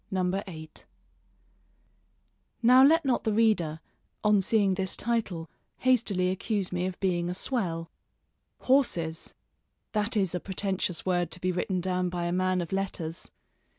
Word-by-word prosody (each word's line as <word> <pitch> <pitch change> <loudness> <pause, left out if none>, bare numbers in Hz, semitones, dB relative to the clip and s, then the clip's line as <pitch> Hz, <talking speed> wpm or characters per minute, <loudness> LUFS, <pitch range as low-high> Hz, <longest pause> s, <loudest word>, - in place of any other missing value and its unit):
V 190 - -1
MY 185 +2 0
HORSES 155 -3 -10 1.8
Now 250 +3 +7
let 320 +3 +5
not 260 -2 +1
the 220 - 0
reader, 190 -9 +2 0.4
on 210 -2 +4
seeing 200 0 +2
this 190 0 -1
title, 205 -9 -2 0.3
hastily 210 -8 +2
accuse 195 0 -2
me 180 0 -1
of 185 - -6
being 175 -2 0
a 180 - -3
swell. 175 -8 -2 0.7
Horses! 175 -12 +1 0.6
That 215 +1 -1
is 190 -4 +1
a 180 - -1
pretentious 190 -2 -2
word 175 -3 +1
to 170 - -5
be 185 +1 0
written 180 +1 -1
down 180 0 0
by 175 -1 -3
a 170 - -1
man 185 0 +1
of 170 - -6
letters! 185 -4 -3
185 Hz, 150 wpm, -28 LUFS, 175-210 Hz, 1.8 s, Now